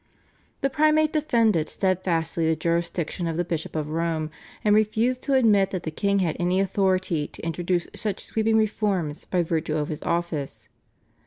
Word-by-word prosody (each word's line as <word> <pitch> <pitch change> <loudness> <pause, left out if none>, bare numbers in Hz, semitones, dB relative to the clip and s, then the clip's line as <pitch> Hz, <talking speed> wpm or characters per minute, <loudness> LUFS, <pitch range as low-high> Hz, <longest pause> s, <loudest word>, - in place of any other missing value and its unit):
The 275 - +2
Primate 310 +1 +3
defended 230 - +2
steadfastly 170 -4 0
the 160 - +2
jurisdiction 170 +1 -1
of 165 -1 -2
the 175 - 0
Bishop 160 -2 -4
of 155 -1 -2
Rome, 160 -1 -1 0.3
and 210 - +4
refused 220 +4 +2
to 280 - -1
admit 210 -6 +4
that 185 -3 -4
the 160 - -3
king 200 +5 +1
had 175 -5 0
any 180 +2 +1
authority 185 -5 +1
to - - -10
introduce 175 +1 -1
such 210 -3 -3
sweeping 220 0 +1
reforms 200 -8 0
by 180 -2 +1
virtue 160 -1 -1
of 150 -1 -2
his 155 - -5
office. 170 -5 -3
180 Hz, 165 wpm, -25 LUFS, 160-210 Hz, 0.3 s, and